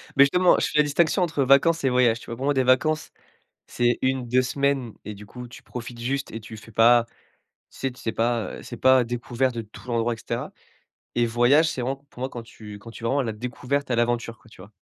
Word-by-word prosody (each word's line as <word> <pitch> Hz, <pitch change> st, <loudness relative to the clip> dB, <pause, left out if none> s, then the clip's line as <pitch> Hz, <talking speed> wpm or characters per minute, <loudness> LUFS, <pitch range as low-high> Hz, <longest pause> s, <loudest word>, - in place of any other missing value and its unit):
Mais 140 Hz, -, +8 dB
justement, 180 Hz, +6 st, +4 dB
je -, -, +1 dB
fais -, -, -2 dB
la -, -, +7 dB
distinction 160 Hz, +5 st, +1 dB
entre 160 Hz, -5 st, 0 dB
vacances 140 Hz, +5 st, +4 dB
et 135 Hz, -, +3 dB
voyages. 125 Hz, -2 st, +3 dB
Tu -, -, -14 dB
vois? 115 Hz, -, -5 dB
Pour 130 Hz, -, -4 dB
moi 145 Hz, -, +2 dB
des 130 Hz, -1 st, +2 dB
vacances, 155 Hz, +5 st, +2 dB, 0.6 s
c'est 120 Hz, 0 st, +1 dB
1-2 130 Hz, -1 st, +1 dB
semaines 135 Hz, -2 st, -1 dB
et 105 Hz, -, -6 dB
du 105 Hz, +1 st, -12 dB
coup 125 Hz, +3 st, -10 dB
tu 120 Hz, -, -13 dB
profites 120 Hz, -1 st, -8 dB
juste 135 Hz, +3 st, -2 dB
et 115 Hz, -, -5 dB
tu 110 Hz, 0 st, -10 dB
fais 115 Hz, +1 st, -14 dB
pas 115 Hz, +2 st, +5 dB, 0.6 s
tu -, -, -17 dB
sais 135 Hz, -, -1 dB
tu 125 Hz, -, -15 dB
fais 110 Hz, -, -2 dB
pas, 115 Hz, -3 st, -1 dB
heu, -, -, -10 dB
c'est -, -, -8 dB
pas 130 Hz, -1 st, +5 dB
découverte 120 Hz, +2 st, -2 dB
de 115 Hz, -, -3 dB
tout 110 Hz, +3 st, -14 dB
l'endroit 120 Hz, 0 st, 0 dB
et -, -, -12 dB
cetera -, -, -5 dB, 0.6 s
et 120 Hz, 0 st, +3 dB
voyage, 120 Hz, +7 st, +4 dB
c'est 130 Hz, -, -4 dB
vraiment 130 Hz, +3 st, -2 dB
pour -, -, -13 dB
moi 130 Hz, -, -1 dB
quand 120 Hz, -3 st, -8 dB
tu 105 Hz, -2 st, -11 dB
quand 110 Hz, +3 st, -12 dB
tu 115 Hz, +1 st, -11 dB
es -, -, 0 dB
vraiment 135 Hz, +5 st, +1 dB
à -, -, -1 dB
la 115 Hz, -, -2 dB
découverte, 125 Hz, +5 st, -3 dB
à 120 Hz, -, +1 dB
l'aventure 120 Hz, 0 st, -1 dB
quoi, -, -, -21 dB
tu 90 Hz, -, -14 dB
vois? 100 Hz, -, -15 dB
125 Hz, 255 wpm, -24 LUFS, 115-135 Hz, 0.6 s, Mais